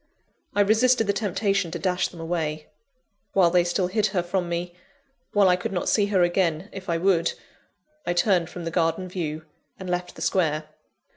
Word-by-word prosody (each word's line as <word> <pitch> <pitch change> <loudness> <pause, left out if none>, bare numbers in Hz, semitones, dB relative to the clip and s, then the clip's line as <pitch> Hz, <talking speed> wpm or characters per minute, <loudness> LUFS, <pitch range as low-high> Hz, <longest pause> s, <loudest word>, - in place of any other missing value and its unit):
I 205 - +4
resisted 225 +3 +4
the 200 - +1
temptation 200 -2 0
to - - -4
dash 180 -1 0
them 170 - -13
away. 160 -2 -2 0.7
While 180 -3 +4
they 180 0 +4
still 175 +2 0
hid 210 +3 +1
her 180 -4 -1
from 175 0 -2
me 175 +1 -3 0.6
while 205 -2 +4
I 180 - +5
could 180 - -4
not 180 -2 -2
see 205 -2 +3
her 190 -3 +3
again, 175 0 0
if 190 -1 -8
I 170 - +1
would 170 -1 +2 0.7
I 175 - -1
turned 175 -2 +2
from 175 -1 -7
the 165 - -3
garden 165 +2 0
view, 160 -4 -4 0.3
and 185 - -8
left 180 0 -3
the - - -6
Square. 155 -4 0
180 Hz, 190 wpm, -25 LUFS, 170-195 Hz, 0.7 s, I